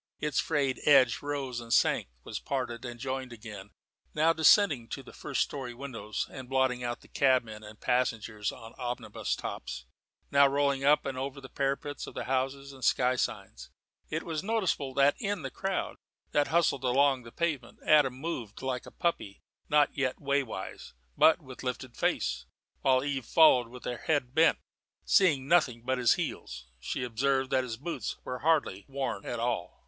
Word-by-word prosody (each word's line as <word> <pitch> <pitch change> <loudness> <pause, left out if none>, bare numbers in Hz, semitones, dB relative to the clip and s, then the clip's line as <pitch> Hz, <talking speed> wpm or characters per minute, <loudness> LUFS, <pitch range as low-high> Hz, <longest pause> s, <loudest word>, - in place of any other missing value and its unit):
Its 150 -3 0
frayed 140 -4 0
edge 130 -5 +6
rose 140 -4 -3
and 115 -1 -9
sank, - - +3 0.2
was - - -5
parted 125 -4 -3
and 120 -1 -7
joined 130 0 -4
again 105 -4 -9 0.5
now 160 +2 +4
descending 160 - +5
to - - -6
the - - -13
first - - -1
storey 130 -4 -6
windows 120 -6 -4
and 130 -2 -9
blotting 130 -2 +1
out 120 0 -3
the - - -17
cabmen 120 -6 +1
and 105 0 -12
passengers 115 -4 0
on 115 -2 -11
omnibus 120 0 -3
tops, - - -6 0.5
now 140 0 +6
rolling 140 -1 +1
up 145 +2 +4
and 135 -2 -3
over 135 +1 -4
the 130 - -10
parapets 140 +2 -2
of - - -10
the - - -3
houses 135 +1 -2
and 135 - -13
the 125 - +1
sky 125 0 +3
signs. 100 - -4 0.4
It 160 +1 -2
was 160 -3 -3
noticeable 190 - -1
that 140 +1 +5
in 205 -6 -2
the 135 - -4
crowd 190 +6 -3 0.3
that 145 -1 +2
hustled 160 -5 +2
along 135 +1 +3
the 115 -1 -12
pavement 150 -7 -2
Adam 145 -4 +5
moved 130 -7 -5
like 130 -2 -3
a - - -10
puppy 165 - -2 0.3
not 150 -1 +3
yet 130 -3 -1
waywise, 140 -9 -3 0.2
but 160 +1 +5
with 130 -2 -10
lifted 125 -1 -4
face, - - -1 0.3
while 130 -1 +3
Eve 135 -4 -3
followed 140 -7 +6
with 125 +1 -12
her 120 - -3
head 140 -5 -1
bent, 160 +2 +5 0.5
seeing 145 -9 +4
nothing 135 -9 +3
but 130 +1 0
his 120 - +4
heels. - - -5
She 65 - -3
observed 130 +3 0
that 130 - +3
his 115 -3 -5
boots 165 +7 -4
were 125 0 -5
hardly 150 -11 +1
worn 135 -7 -3
at 120 - -3
all. 120 +1 -2
130 Hz, 175 wpm, -30 LUFS, 120-145 Hz, 0.5 s, edge